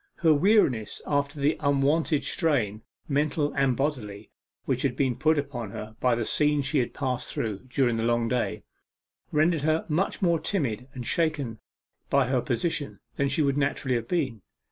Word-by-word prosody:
Her 160 -3 +4
weariness 145 - +2
after 145 0 -1
the 145 +3 +2
unwonted 145 +2 +2
strain, 120 - 0 0.3
mental 145 +1 0
and 135 -3 +1
bodily, 110 -8 -3 0.3
which 130 -2 0
had 130 -3 0
been 130 -2 +1
put 155 +5 +2
upon 130 -6 -3
her 110 +2 -8
by 125 -2 +3
the 115 -1 -2
scenes 150 +1 +2
she 145 +1 +1
had 120 - -2
passed 130 -3 -2
through 110 0 -3
during 125 -3 +1
the 115 - -1
long 120 0 +1
day, 125 0 -1 0.7
rendered 155 +1 +2
her 155 +2 +1
much 170 +4 0
more 170 -3 +2
timid 130 - -2
and 125 -2 -6
shaken 145 -8 -1 0.5
by 140 -1 +3
her 125 0 +1
position 145 +3 -2 0.2
than 140 0 +1
she 155 +3 +1
would 140 -1 +1
naturally 140 -2 0
have 115 -1 -1
been. 135 - -1
140 Hz, 170 wpm, -27 LUFS, 120-155 Hz, 0.7 s, Her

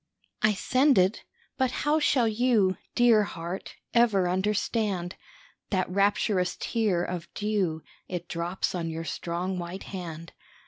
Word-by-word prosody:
I 215 -1 +3
send 260 +8 +3
it, 185 +3 +3 0.4
but 260 -1 +3 0.2
how 300 +2 +3
shall 260 -5 +3
you, 220 -4 +2 0.2
Dear 240 -3 +6
heart, 175 -2 -5 0.2
ever 220 -6 +4
understand 195 -1 0 0.5
That 185 -2 +1
rapturous 200 -1 +1
tear 210 -7 0
of 175 -1 -5
dew, 195 -7 -1 0.2
It 175 -1 -5
drops 175 +2 -2
on 170 -2 -2
your 165 0 -4
strong 180 +3 -3
white 175 +2 -6
hand? 165 -3 -7
190 Hz, 130 wpm, -27 LUFS, 175-215 Hz, 0.5 s, Dear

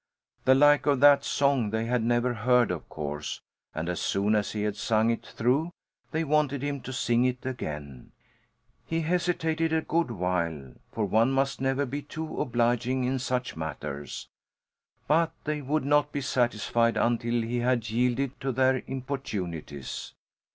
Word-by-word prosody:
The 130 +1 +6
like 145 -1 +5
of 140 -2 +3
that 140 -1 +7
song 140 -6 +1
they 110 +1 -1
had 120 0 +1
never 120 +2 +1
heard, 120 0 +3
of 90 - -5
course, 75 -1 -5 0.4
and 80 +1 -3
as 90 - -2
soon 100 +2 +1
as 105 -1 0
he 105 -1 -2
had 105 -1 -1
sung 110 +2 +2
it 115 - -3
through 135 +8 0 0.4
they 160 +1 -1
wanted 145 -3 +1
him 145 -1 -2
to 130 - -7
sing 120 -1 +1
it 125 0 -1
again. 75 - -6 0.8
He 165 0 0
hesitated 165 -1 0
a 160 0 +1
good 165 -2 0
while 85 - -2 0.2
for 110 - -1
one 110 +6 +3
must 135 -1 0
never 135 +1 +1
be 140 +3 -4
too 160 +2 -5
obliging 120 +1 +1
in 130 +1 0
such 125 -1 -2
matters 75 -3 -5 0.8
but 165 +2 +3
they 150 -1 -2
would 145 +2 -1
not 145 +1 +3
be 145 - -2
satisfied 120 -3 +1
until 120 0 +1
he 120 +2 -2
had 120 -2 0
yielded 125 +3 0
to 135 - -1
their 130 0 +2
importunities. 95 - -5
125 Hz, 160 wpm, -28 LUFS, 110-140 Hz, 0.8 s, that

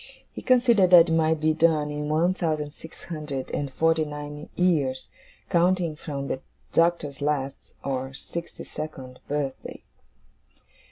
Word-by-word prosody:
He - - -8
considered 240 -7 +4
that 175 -2 +8
it - - 0
might 160 -1 +2
be 155 +1 +2
done 155 -2 +2
in 150 0 -3
one 165 +4 +2
thousand 155 -5 -2
six 160 - -11
hundred 150 -5 -5
and 140 -2 -2
forty 160 +3 +2
nine 150 0 -7
years, 145 -8 +1 0.4
counting 175 -2 +2
from 140 -3 -5
the 130 - -3 0.3
Doctor's 165 -5 +1
last, 140 -2 -2
or 130 -1 -2
sixty 170 +4 -7
second, 130 -5 -7
birthday. 140 -2 -4
155 Hz, 135 wpm, -26 LUFS, 145-170 Hz, 0.4 s, that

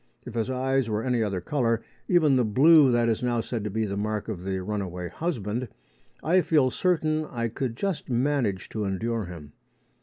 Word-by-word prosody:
If 125 - -8
his 115 +1 -1
eyes 130 -1 0
were 105 +1 -1
any 125 -2 +1
other 100 -4 -1
colour 115 0 0 0.2
even 160 -6 +4
the 125 - +3
blue 140 +5 +6
that 120 -1 +2
is 115 -2 0
now 120 -1 0
said 115 -1 -3
to - - -1
be 110 +2 -1
the 100 -1 -3
mark 105 +1 -2
of 95 -5 -5
the 95 0 -2
runaway 90 -3 -4
husband 120 - -3 0.6
I 185 +3 +4
feel 150 -6 +3
certain 155 -3 +1
I 115 -5 -3
could 120 +1 -3
just 195 -5 -3
manage 125 -6 0
to 110 - -3
endure 110 +3 -2
him. 80 -5 -10
115 Hz, 190 wpm, -26 LUFS, 105-135 Hz, 0.6 s, blue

